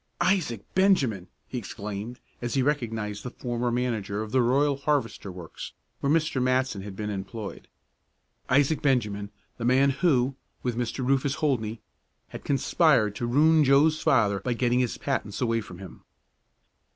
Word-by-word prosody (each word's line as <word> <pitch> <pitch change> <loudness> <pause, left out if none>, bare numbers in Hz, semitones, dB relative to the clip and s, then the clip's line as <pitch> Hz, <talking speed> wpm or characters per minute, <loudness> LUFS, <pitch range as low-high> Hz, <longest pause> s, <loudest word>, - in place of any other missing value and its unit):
"Isaac 150 - +1
Benjamin!" 135 - +2 0.2
he 125 - -4
exclaimed, 105 +2 -6 0.2
as 120 +1 -3
he 135 - +2
recognized 115 -7 -2
the 125 - -5
former 120 -1 -3
manager 110 -4 -1
of 110 - -8
the 130 - +3
Royal 140 +4 +3
Harvester 140 -8 -1
works 90 -2 -9 0.3
where 140 - 0
Mr. 155 -4 +1
Matson 130 -4 +1
had 100 0 -8
been 105 +1 -4
employed. 100 +2 -6 0.8
Isaac 145 +4 +3
Benjamin, 105 -7 0 0.3
the - - -4
man 135 +3 +4
who, 135 -3 +2 0.3
with 125 -2 -1
Mr. 125 +2 -2
Rufus 135 +1 +1
Holdney, 120 -8 -1 0.5
had - - -9
conspired 135 - +2
to 120 - -2
ruin 155 +5 +5
Joe's 145 +3 +4
father 105 -6 +3
by 120 +6 -1
getting 120 +1 +1
his 125 -2 0
patents 120 -7 -3
away 115 -2 +1
from 90 -4 -11
him. 95 -3 -11
125 Hz, 150 wpm, -26 LUFS, 105-140 Hz, 0.8 s, ruin